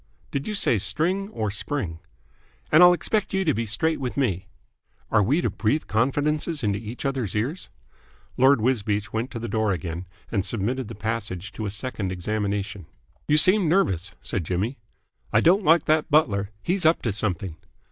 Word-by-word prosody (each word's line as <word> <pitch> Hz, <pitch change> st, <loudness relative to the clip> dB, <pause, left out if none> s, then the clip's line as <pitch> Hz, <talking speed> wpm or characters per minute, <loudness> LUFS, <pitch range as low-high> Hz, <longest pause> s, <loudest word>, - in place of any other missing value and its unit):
"Did 140 Hz, 0 st, -3 dB
you 215 Hz, -, -2 dB
say 120 Hz, -, +2 dB
string 165 Hz, -, -1 dB
or 110 Hz, -, -3 dB
spring?" 100 Hz, -, -3 dB, 0.7 s
"And 155 Hz, -, +7 dB
I'll 180 Hz, 0 st, +9 dB
expect 195 Hz, +3 st, 0 dB
you 190 Hz, 0 st, +1 dB
to 155 Hz, -, +3 dB
be 115 Hz, -1 st, -2 dB
straight 160 Hz, +10 st, 0 dB
with 130 Hz, -1 st, -4 dB
me." 95 Hz, -9 st, 0 dB, 0.6 s
"Are 110 Hz, -, +4 dB
we 140 Hz, -, +2 dB
to -, -, 0 dB
breathe 115 Hz, +8 st, 0 dB
confidences 145 Hz, +6 st, 0 dB
into 100 Hz, -1 st, 0 dB
each 115 Hz, +5 st, -7 dB
other's 130 Hz, -8 st, -2 dB
ears?" 130 Hz, -, -2 dB, 0.7 s
Lord 135 Hz, -1 st, +5 dB
Wisbeach 105 Hz, -4 st, 0 dB
went 115 Hz, +3 st, -2 dB
to 120 Hz, -, -7 dB
the 115 Hz, +1 st, -4 dB
door 110 Hz, -1 st, 0 dB
again 85 Hz, 0 st, -4 dB, 0.2 s
and 100 Hz, -4 st, 0 dB
submitted 120 Hz, +4 st, -2 dB
the 115 Hz, -, -8 dB
passage 105 Hz, -3 st, -4 dB
to 110 Hz, +1 st, -5 dB
a -, -, -2 dB
second 105 Hz, -2 st, -4 dB
examination. 100 Hz, -1 st, -3 dB, 0.4 s
"You 150 Hz, -, +4 dB
seem 185 Hz, +1 st, +6 dB
nervous," 95 Hz, -, +1 dB
said 95 Hz, -, -2 dB
Jimmy. 95 Hz, -, -2 dB, 0.5 s
"I -, -, +4 dB
don't 190 Hz, +5 st, +4 dB
like 165 Hz, -1 st, +4 dB
that 155 Hz, 0 st, +2 dB
butler. 100 Hz, -10 st, +2 dB
He's 180 Hz, +2 st, 0 dB
up 160 Hz, +1 st, +3 dB
to 115 Hz, -, 0 dB
something." 95 Hz, -5 st, -3 dB
115 Hz, 175 wpm, -24 LUFS, 100-150 Hz, 0.7 s, I'll